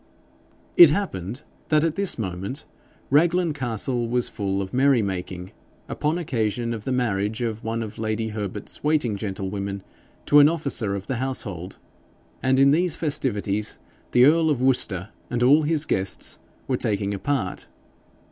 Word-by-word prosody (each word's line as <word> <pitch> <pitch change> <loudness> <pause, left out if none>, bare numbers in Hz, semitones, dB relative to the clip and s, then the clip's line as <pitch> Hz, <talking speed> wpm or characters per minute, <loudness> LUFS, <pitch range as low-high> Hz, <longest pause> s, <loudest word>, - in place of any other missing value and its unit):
It 350 -1 +11
happened 125 - -3 0.3
that 155 -1 +3
at 165 -2 +1
this 200 +2 0
moment 100 +4 -4 0.5
Raglan 170 +3 +3
Castle 120 -2 -2
was 125 0 +1
full 100 -2 -2
of 95 -1 -5
merry 130 -2 +4
making 90 -1 -5 0.4
upon 155 +3 -1
occasion 115 - -1
of 110 -2 -7
the 130 - -2
marriage 110 -2 -1
of 115 -1 -3
one 115 +1 -2
of 110 -1 -8
lady 110 0 -2
Herbert's 105 -1 -6
waiting 150 -8 +1
gentlewomen 100 -1 -4 0.4
to 145 - +6
an 145 +1 +7
officer 140 -11 -1
of 100 0 -6
the 130 - -3
household; 100 -9 -4 0.6
and 130 0 +2
in 135 +1 +6
these 170 +2 +2
festivities 110 -9 -1 0.3
the 125 +1 +6
earl 160 +2 +4
of 145 -5 +1
Worcester 110 -7 +1 0.2
and 120 0 0
all 145 +5 +6
his 155 0 0
guests 95 -6 0 0.3
were - - 0
taking 100 -1 -1
a 100 - -4
part. 130 -9 -2
120 Hz, 155 wpm, -24 LUFS, 100-145 Hz, 0.6 s, It